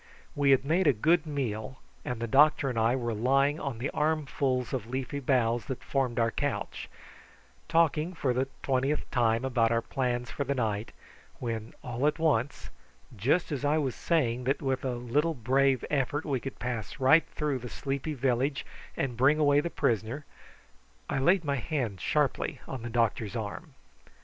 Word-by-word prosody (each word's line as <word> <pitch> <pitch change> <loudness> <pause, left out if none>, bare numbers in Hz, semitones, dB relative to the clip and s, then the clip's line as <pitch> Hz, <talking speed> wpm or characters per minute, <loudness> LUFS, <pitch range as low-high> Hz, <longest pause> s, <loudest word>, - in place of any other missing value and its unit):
We 145 -1 +2
had 135 0 +4
made 165 +4 +2
a 145 - +6
good 160 +8 +2
meal, 130 -4 -3 0.2
and 125 -2 -4
the 115 - -2
doctor 140 +2 +4
and 115 - -2
I 115 +3 +3
were 120 -3 -2
lying 135 +7 +2
on 135 -5 -4
the 125 +5 -3
armfuls 140 -5 0
of 120 -5 -3
leafy 130 +3 -3
boughs 120 -4 +1
that 130 - -5
formed 130 -3 -1
our 115 -1 +2
couch, - - -3 0.8
talking 165 +1 +2
for 135 -6 0
the 130 +2 0 0.2
twentieth 135 +2 0
time 115 0 +2
about 120 -3 +2
our 115 0 +1
plans 120 -1 -2
for 140 - -2
the 140 +1 -1
night, 110 -3 -1 0.5
when 115 -2 -5
all 125 +3 -1
at 150 - +1
once, 145 -5 0 0.4
just 140 - +1
as 145 -1 -3
I 145 +2 +2
was 135 -5 0
saying 125 -7 0
that 135 +2 +1
with 135 -1 -1
a 130 -2 -1
little 145 +7 0
brave 130 +2 +2
effort 145 +1 0
we 140 -4 0
could 135 +2 -7
pass 120 -5 -4
right 135 +5 +5
through 150 -4 -1
the 125 0 -7
sleepy 140 +4 -3
village 135 +2 0 0.3
and 130 -3 -1
bring 135 +5 +4
away 145 -2 +4
the 170 - -1
prisoner, 115 +2 -1 0.9
I - - 0
laid 175 +5 +3
my 140 -1 0
hand 120 - -3
sharply - - 0
on 130 - -5
the 120 - -5
doctor's 115 -2 0
arm. 115 - -6
130 Hz, 175 wpm, -29 LUFS, 120-145 Hz, 0.9 s, a